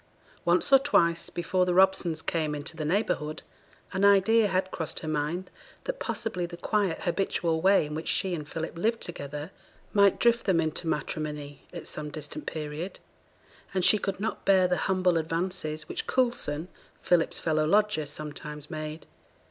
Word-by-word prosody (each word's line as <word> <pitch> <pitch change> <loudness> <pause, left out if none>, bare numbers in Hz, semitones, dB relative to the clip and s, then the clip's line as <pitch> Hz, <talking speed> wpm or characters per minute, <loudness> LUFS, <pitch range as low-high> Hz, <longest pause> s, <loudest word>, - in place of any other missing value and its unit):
Once 325 -4 +3
or 270 - +10
twice 170 -12 +2
before 180 +2 0
the 180 -1 +1
Robsons 185 -4 +3
came 155 -3 -1
into 150 +3 -4
the 155 - -4
neighbourhood, 155 -4 -1 0.5
an 190 +1 0
idea 200 +2 +5
had 185 -1 0
crossed 160 -4 -4
her 155 - -6
mind 155 +5 -2 0.3
that - - -4
possibly 185 -6 -3
the 170 0 -9
quiet, 200 -3 0
habitual 170 -3 0
way 195 -2 +5
in 150 - -6
which 160 +2 -5
she 190 -2 +1
and 150 -3 -5
Philip 165 +1 -4
lived 225 +5 +1
together, 145 -2 -6 0.4
might 200 -2 +5
drift 235 -1 +3
them 185 -4 +4
into 160 +1 -1
matrimony 150 -2 -4
at 170 - -8
some 150 -1 -4
distant 150 0 -7
period; 155 +4 -5 0.8
and 185 -1 +3
she 215 - +7
could 195 -1 -3
not 225 +2 -3
bear 190 -2 +5
the 180 0 +1
humble 185 -2 +2
advances 160 -1 -3
which - - -4
Coulson, 210 - 0 0.4
Philip's 175 -2 +3
fellow 155 -1 +1
lodger, 205 -4 +2
sometimes 150 +1 -7
made. 155 0 -5
170 Hz, 165 wpm, -28 LUFS, 155-190 Hz, 0.8 s, or